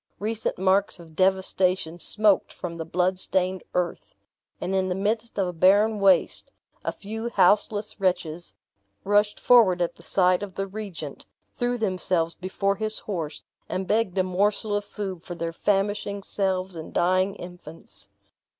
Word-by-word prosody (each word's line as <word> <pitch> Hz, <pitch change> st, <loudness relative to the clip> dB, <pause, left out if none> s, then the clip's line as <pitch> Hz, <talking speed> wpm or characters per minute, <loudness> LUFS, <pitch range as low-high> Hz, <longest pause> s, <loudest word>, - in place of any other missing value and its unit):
Recent 220 Hz, +1 st, -2 dB
marks 190 Hz, +2 st, +2 dB
of 160 Hz, -2 st, -14 dB
devastation 185 Hz, -2 st, +1 dB
smoked 210 Hz, +3 st, +5 dB
from 170 Hz, -2 st, -6 dB
the 165 Hz, -, -4 dB
blood 180 Hz, +3 st, 0 dB
stained 185 Hz, 0 st, -1 dB
earth; 180 Hz, -1 st, -2 dB, 0.4 s
and 190 Hz, -, -3 dB
in 190 Hz, -1 st, +1 dB
the 180 Hz, -, -1 dB
midst 220 Hz, +4 st, -2 dB
of 195 Hz, -2 st, +1 dB
a 180 Hz, -, -4 dB
barren 205 Hz, +5 st, +4 dB
waste, 190 Hz, -3 st, +3 dB, 0.3 s
a -, -, -1 dB
few 225 Hz, +3 st, -5 dB
houseless 210 Hz, +1 st, +2 dB
wretches 175 Hz, -3 st, -1 dB, 0.5 s
rushed 205 Hz, +1 st, +2 dB
forward 220 Hz, -8 st, +5 dB
at 175 Hz, -1 st, -1 dB
the -, -, -15 dB
sight 180 Hz, +2 st, +2 dB
of 200 Hz, -3 st, -7 dB
the 195 Hz, -, -2 dB
regent, 190 Hz, -7 st, -7 dB, 0.3 s
threw 245 Hz, 0 st, -1 dB
themselves 185 Hz, -5 st, 0 dB
before 195 Hz, +2 st, -2 dB
his 215 Hz, 0 st, -2 dB
horse, 165 Hz, -7 st, -5 dB, 0.3 s
and 190 Hz, -, -2 dB
begged 210 Hz, -1 st, 0 dB
a 185 Hz, -, +4 dB
morsel 205 Hz, +3 st, 0 dB
of 205 Hz, 0 st, -2 dB
food 190 Hz, -5 st, -6 dB
for 175 Hz, -, -7 dB
their 170 Hz, 0 st, -4 dB
famishing 200 Hz, +1 st, -1 dB
selves 190 Hz, -2 st, -1 dB
and 160 Hz, -1 st, -8 dB
dying 185 Hz, +3 st, +2 dB
infants. 175 Hz, -4 st, -10 dB
190 Hz, 155 wpm, -25 LUFS, 180-205 Hz, 0.5 s, smoked